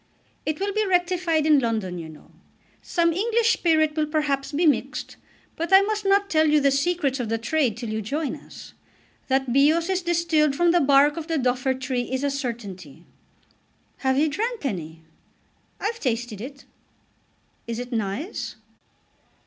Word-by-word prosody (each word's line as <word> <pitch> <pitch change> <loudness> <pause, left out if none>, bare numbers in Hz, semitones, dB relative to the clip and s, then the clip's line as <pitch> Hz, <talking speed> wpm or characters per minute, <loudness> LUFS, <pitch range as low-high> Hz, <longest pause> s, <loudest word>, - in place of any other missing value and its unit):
"It 310 -1 -1
will 400 +1 -1
be 430 +1 +1
rectified 355 -4 +1
in 305 -2 +5
London, 215 -7 -2
you 160 -1 -7
know. 155 - -15 0.5
Some 335 -1 +1
English 460 +5 +2
spirit 315 -3 +2
will 310 -1 0
perhaps 295 -3 -1
be 315 +4 +1
mixed. 295 - 0 0.4
But 335 +2 -4
I 385 +1 +8
must 420 0 -2
not 400 +1 +3
tell 315 -4 +3
you 300 0 +4
the 280 -1 +3
secrets 280 -1 0
of 235 -3 -3
the 225 - 0
trade 250 -2 0
till 235 -2 -5
you 220 0 -2
join 285 +7 -3
us. - - -13 0.5
That 265 -2 0
Bios 315 +6 +3
is 375 0 0
distilled 335 -4 +1
from 345 +3 +3
the 350 0 +3
bark 285 +2 +4
of 325 -1 -5
the 325 -2 0
Duffer 255 0 0
tree 255 -1 -3
is 260 +1 -1
a 285 - +1
certainty." 195 - -6 0.9
"Have 265 -1 0
you 305 +3 +3
drank 440 +5 -3
any?" 165 - -5 0.8
"I've 450 +3 -3
tasted 240 - -2
it." 275 +3 -9 1.0
"Is 230 -1 -3
it 245 +1 -6
nice?" 225 - -3
290 Hz, 165 wpm, -24 LUFS, 245-340 Hz, 1.0 s, I